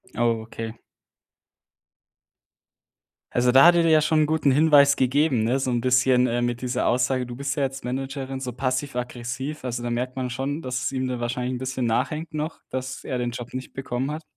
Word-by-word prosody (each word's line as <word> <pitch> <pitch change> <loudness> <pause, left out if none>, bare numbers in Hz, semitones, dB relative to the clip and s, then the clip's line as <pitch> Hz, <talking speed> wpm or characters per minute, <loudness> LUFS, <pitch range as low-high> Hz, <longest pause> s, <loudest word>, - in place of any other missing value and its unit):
Ah, - - -2 0.2
okay. 115 0 -7 2.5
Also, 125 0 +2
da 135 +3 +7
hat 175 - +6
er 170 - +4
dir 165 - +3
ja 155 -1 +6
schon 155 +1 +2
'n - - +4
guten 155 -1 +1
Hinweis 145 -1 +6
gegeben, 130 -1 +2
ne, 125 +4 +1
so 130 - -1
'n 120 -1 0
bisschen, 125 0 +3
äh, 120 0 0
mit 120 0 -1
dieser 125 0 0
Aussage, 125 +1 +1
du 120 - -7
bist 135 +1 -3
ja 145 - -1
jetzt 135 -1 -4
Managerin, 135 +1 -4
so 130 -1 -4
passiv-aggressiv. 130 +1 -3
Also, 120 -1 -3
da 120 - -2
merkt 125 +2 -2
man 130 -1 -3
schon, 140 +5 -3
dass 125 -1 -3
es - - 0
ihm 130 -1 -2
dann 125 -1 -3
wahrscheinlich 125 +1 -2
'n 125 - -4
bisschen 130 -1 -2
nachhängt 145 +8 -1
noch, 155 +2 -4
dass 130 0 -4
er 130 - -3
den 120 0 -1
Job 120 0 -8
nicht 130 0 -6
bekommen 130 0 -3
hat. 155 +2 -5
130 Hz, 205 wpm, -24 LUFS, 125-140 Hz, 2.5 s, da